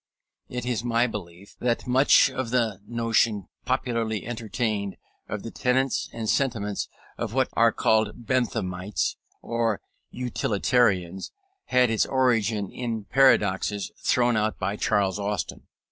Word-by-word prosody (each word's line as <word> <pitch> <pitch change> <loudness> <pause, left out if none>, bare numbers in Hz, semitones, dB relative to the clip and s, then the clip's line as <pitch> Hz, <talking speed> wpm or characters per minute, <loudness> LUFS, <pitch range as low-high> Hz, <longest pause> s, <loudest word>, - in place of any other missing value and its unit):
It 125 -1 -4
is 120 -2 -1
my 120 0 +2
belief 100 -4 -7
that 120 -1 0
much 130 +2 +5
of 130 -2 -3
the 115 -6 0
notion 115 -3 +1 0.2
popularly 115 -4 -1
entertained 110 -3 -2 0.3
of 105 -1 -4
the 115 - -6
tenets 130 +1 0
and 115 -1 -5
sentiments 110 -6 0 0.3
of 115 0 -3
what 130 -1 +2
are 115 0 +4
called 110 +2 +1
Benthamites 105 -6 -1 0.3
or 115 -3 0 0.3
Utilitarians 105 -6 0 0.3
had 125 -2 +3
its 110 - +2
origin 115 -6 +1
in 115 -3 -3
paradoxes 105 -6 +3
thrown 120 -1 +3
out 110 0 0
by 100 +1 -2
Charles 100 -2 +1
Austin. 100 0 -3
115 Hz, 125 wpm, -26 LUFS, 105-125 Hz, 0.3 s, much